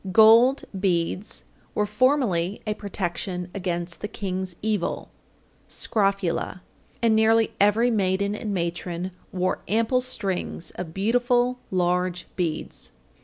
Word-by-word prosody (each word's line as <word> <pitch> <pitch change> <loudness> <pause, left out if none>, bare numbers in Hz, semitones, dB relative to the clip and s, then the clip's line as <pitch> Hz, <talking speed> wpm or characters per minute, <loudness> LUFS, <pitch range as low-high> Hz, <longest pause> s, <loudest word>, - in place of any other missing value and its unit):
Gold 225 +6 +7 0.2
beads 185 +1 -1 0.3
were 210 - +2
formerly 210 -5 +2
a 215 - 0
protection 180 -3 -4
against 175 -3 -3
the 210 - -2
"King's 190 -3 -4
Evil" 215 -5 -1 0.6
(scrofula), 195 -4 -1 0.4
and 225 -1 +5
nearly 220 0 +4
every 220 +4 +4
maiden 200 -1 +1
and 210 0 -4
matron 175 0 -2 0.2
wore 185 0 -1
ample 230 +4 +2
strings 195 -9 -3
of 175 -3 -6
beautiful 245 +4 +2
large 180 -1 0
beads. 160 - -3
200 Hz, 110 wpm, -25 LUFS, 180-220 Hz, 0.6 s, Gold